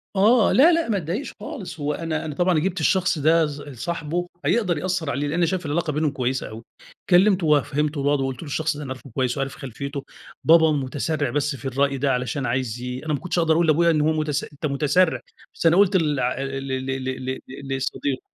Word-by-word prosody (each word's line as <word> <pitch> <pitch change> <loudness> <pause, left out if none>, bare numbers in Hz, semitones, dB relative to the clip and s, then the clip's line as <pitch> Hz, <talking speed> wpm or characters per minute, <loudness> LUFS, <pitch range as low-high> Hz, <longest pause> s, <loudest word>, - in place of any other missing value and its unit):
آه، 215 +3 +5
آه، - - +1
لا 305 +7 +6
لأ، 330 -6 0
ما 210 - +1
اتضايقش 190 - -4
خالص، 175 -6 -7
هو 145 +1 -1
أنا 160 0 -3
أنا 150 -2 -5
طبعًا 180 +1 +2
أنا 165 - +3
جِبت 185 +2 -1
الشخص 180 +1 +2
ده 160 +2 +4
ص 145 0 -7
صاحبه 165 +5 -4 0.2
هيقدر 185 -8 +2
يأثر 175 -1 -2
عليه، 145 +1 -2
لأني 165 +3 +1
شايف 180 0 -2
العلاقة 155 +1 -1
بينهم 150 -1 0
كويسة 130 -1 -2
أوي، 110 +2 -9 0.5
كلّمته 185 -1 +4
وفهّمته 150 0 +1
الوضع 140 -1 +1
وقلت 130 -2 -4
له - - -9
الشخص 150 +1 -1
ده 150 - -6
أنا 135 - -6
عارفه 130 +1 -13
كويس 130 +1 -1
وعارف 135 0 -3
خلفيته، 140 +2 -6 0.4
بابا 160 -1 +6
متسرع 145 +1 -1
بس 145 +1 -1
في 120 - -11
الرأي 140 +1 0
ده 135 0 +1
علشان 125 +2 -2
عايز 120 -1 -2
يي 125 +3 -5
أنا 155 - -1
ما 145 - -1
كنتش 175 0 -2
أقدر 165 -1 +3
أقول 165 0 +2
لأبويا 170 +2 +4
إن 155 - +2
هو 155 +1 +2
متس 155 -2 -1
أنت 145 +1 -7
متسرع، 150 +5 +2 0.3
بس - - -6
أنا 165 +2 +5
قلت 200 0 +4
لع 145 -7 0
ل 135 0 -4
ل 130 0 -3
ل 135 0 -3 0.2
ل 130 0 -3 0.3
ل 135 0 -2
لصديقه. 135 0 -2
150 Hz, 220 wpm, -23 LUFS, 135-170 Hz, 0.5 s, لا